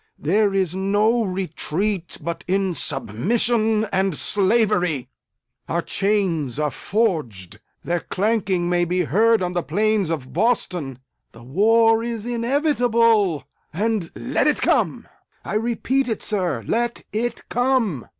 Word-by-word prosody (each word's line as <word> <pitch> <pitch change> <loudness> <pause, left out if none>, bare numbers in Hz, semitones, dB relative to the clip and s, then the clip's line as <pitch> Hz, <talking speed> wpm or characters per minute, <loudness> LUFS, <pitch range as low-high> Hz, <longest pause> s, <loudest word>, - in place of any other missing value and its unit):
There 200 +7 +2
is 190 -3 0
no 205 +5 +2
retreat 185 0 -3
but 170 +2 -4
in 190 0 +1
submission 220 - 0
and 190 -3 +1
slavery! 190 - +1 0.6
Our 170 0 0
chains 185 - 0
are 150 -1 0
forged! 125 - -2 0.2
Their 175 0 -1
clanking 195 -3 0
may 175 0 +2
be 180 +1 0
heard 220 +5 +3
on 180 0 -2
the 175 - 0
plains 215 -1 0
of 145 -6 -4
Boston! 180 - 0 0.4
The 115 - -14
war 225 - +3
is 230 -2 -4
inevitable 235 - +2 0.3
and 210 -1 -1
let - - 0
it - - +1
come! - - +1 0.4
I - - -4
repeat 240 +4 0
it, 220 - -3
sir, 175 - -1
let 240 +1 -1
it 230 +2 -3
come! 245 - 0
195 Hz, 125 wpm, -22 LUFS, 170-225 Hz, 0.6 s, heard